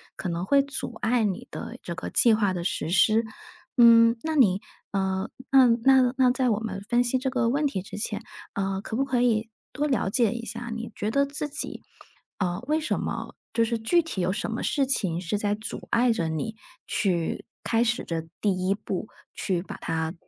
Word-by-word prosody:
可 185 - -4
能 170 +2 -2
会 280 +6 +5
阻 280 -3 -4
碍 230 0 +2
你 195 -3 -2
的 - - -7
这 170 - -5
个 185 - -5
计 235 - +5
划 205 -4 +1
的 175 -1 -3
实 160 -3 -2
施。 215 +5 +4 0.5
嗯， 230 -1 +7
那 320 0 -2
你 200 -9 +4 0.3
呃， 190 0 -1 0.2
那 265 -1 +7 0.2
那 260 -1 +5
那 255 -1 +4
在 255 0 +1
我 210 - +1
们 205 -4 -4
分 240 +1 +3
析 245 +2 +1
这 260 0 -2
个 245 -3 +1
问 285 +4 +1
题 195 -10 -1
之 195 - -9
前， 210 0 -3 0.3
呃， 195 -1 -1
可 220 - -5
不 270 - +2
可 250 -3 +1
以 225 -2 +2 0.2
多 295 +1 -1
了 255 -8 +1
解 230 0 +2
一 235 -1 -5
下， 235 +1 -6
你 230 0 -6
觉 210 - -2
得 280 +4 +2
自 285 +1 -4
己， 290 - -5 0.6
呃， 180 -2 -1
为 310 +1 +2
什 305 - -1
么 - - -4 0.2
就 230 -1 +2
是 230 0 -1
具 340 +10 +3
体 310 - -4
有 180 +1 +1
什 220 +2 -3
么 225 - -3
事 280 -2 +1
情 190 -11 0
是 185 +3 -2
在 205 0 0
阻 215 +1 -7
碍 245 +1 +3
着 170 -7 0
你 160 +8 -3 0.3
去 175 -5 -1 0.2
开 230 0 +1
始 235 +1 +1
这 165 -1 -4
第 185 -3 0
一 195 - +2
步， 200 0 -4 0.3
去 180 -4 -1
把 195 +1 -8
它 160 0 -2
225 Hz, 225 characters per minute, -26 LUFS, 190-250 Hz, 0.6 s, 嗯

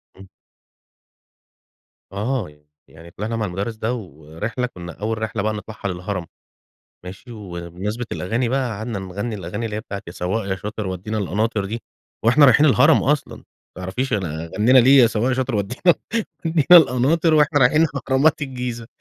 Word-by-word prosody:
امم. 95 0 -14 1.8
آه 105 - -2
يع 75 - -19 0.3
يعني 85 +2 -14
طلعنا 110 +5 -4
مع 110 - -1
الُمدرس 100 +5 -4
ده، 110 +3 -2
ورحلة 90 - -5
كنا 85 -6 -9
أول 110 +3 -3
رحلة 110 -1 -3
بقى 110 0 0
نطلعها 105 0 -6
للهرم، 90 0 -4 0.8
ماشي، 100 +7 -10
وبمناسبة 95 +3 -6
الأغاني 115 +6 -1
بقى 130 -1 0
قعدنا 110 -1 -4
نغني 100 +4 -5
الأغاني 100 +4 -5
اللي 105 -2 -4
هي 105 - -2
بتاعة 100 0 -7
يا 85 - -6
سواق 95 +4 -2
يا 95 - 0
شاطر 105 0 -5
ودينا 95 +4 -4
القناطر 105 +1 -1
دي، 115 +4 -4 0.5
وإحنا 135 +6 +6
رايحين 140 +3 +6
الهرم 140 +2 +5
أصلًا. 145 +1 0
ما 90 - -15
تعرفيش 125 +9 -2
أن 80 -5 -3
غنينا 120 +5 +5
ليه 135 +2 +7
يا 120 - +6
سواق 115 +3 0
يا - - +2
شاطر 130 -2 -1
ودي 100 +4 -2 0.7
وَدِينَا 160 -2 +2
القناطر 160 +1 +6
وإحنا 150 -1 +4
رايحين 150 +6 +5 0.2
اهرامات 140 +3 +3
الجيزة 125 -4 -5
110 Hz, 165 wpm, -21 LUFS, 95-125 Hz, 1.8 s, ليه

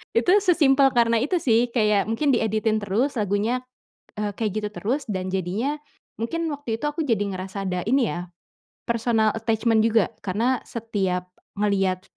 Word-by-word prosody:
Itu, 230 +9 +3
sesimpel 290 -8 +4
karena 230 -1 +4
itu 295 +10 0
sih. 235 -1 +3
Kayak 210 -3 +2
mungkin 275 +6 +1
dieditin 220 -2 +1
terus, 215 +8 0
lagunya, 210 +4 0 0.6
eee, 210 -1 -2
kayak 220 -2 -1
gitu 210 - -2
terus, 255 +8 -2
dan 185 -1 -3
jadinya, 190 - -1 0.4
mungkin 330 +9 -2
waktu 280 -6 -4
itu 295 - -4
aku 295 +2 -2
jadi 230 -7 +1
ngerasa 190 +1 -5
ada, 180 -1 -1
ini 250 +2 +2
ya, 175 0 -5 0.6
personal 230 -2 +1
attachment 225 0 +1
juga. 225 -3 +2
Karena 230 +7 0
setiap 190 -6 -2 0.3
ngelihat 195 -3 +1
225 Hz, 155 wpm, -24 LUFS, 200-245 Hz, 0.6 s, sesimpel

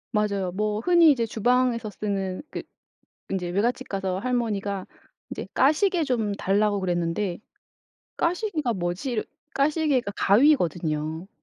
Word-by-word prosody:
맞아요. 200 -3 0
뭐 210 +2 -1
흔히 340 +2 +6
이제 240 -5 +1
주방에서 235 0 +1
쓰는 195 0 -3
그 - - -4 0.7
인제 180 -2 -2
외갓집 235 +8 -1
가서 190 -2 -2
할머니가 205 -5 -1 0.5
인제 - - -5
까시개 320 +4 +3
좀 225 -6 0
달라고 205 +1 +1
그랬는데 175 +1 -1 0.8
'까시개가 335 - 0
뭐지.' 190 +6 -2 0.3
까시개가 280 -6 +1
가위거든요. 170 - +2
210 Hz, 285 characters per minute, -25 LUFS, 190-255 Hz, 0.8 s, 흔히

